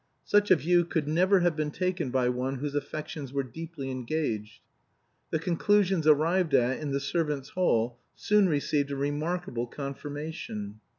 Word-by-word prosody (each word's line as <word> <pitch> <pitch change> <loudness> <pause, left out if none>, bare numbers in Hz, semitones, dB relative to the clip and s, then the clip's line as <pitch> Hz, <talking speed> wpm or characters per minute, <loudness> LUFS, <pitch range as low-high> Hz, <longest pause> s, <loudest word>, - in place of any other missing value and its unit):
Such 205 0 +3
a 185 - +8
view 175 +2 +3
could 160 -3 -2
never 185 +5 +4
have 175 -2 +2
been 155 -1 -1
taken 180 -2 -1
by 125 -1 +1
one 125 +2 -1
whose 140 +2 -4
affections 145 -1 -4
were 140 0 -1
deeply 140 +1 -7
engaged. 115 -5 -3 0.7
The - - +1
conclusions 180 +1 +2
arrived 160 +1 +4
at 125 +1 +2
in 150 - -4
the 140 0 0
servants' 145 -2 -2
hall 120 -9 +1 0.2
soon 210 -2 +3
received 145 -1 0
a 140 - -3
remarkable 145 -2 -2
confirmation. 140 -6 -6
150 Hz, 155 wpm, -28 LUFS, 135-170 Hz, 0.7 s, a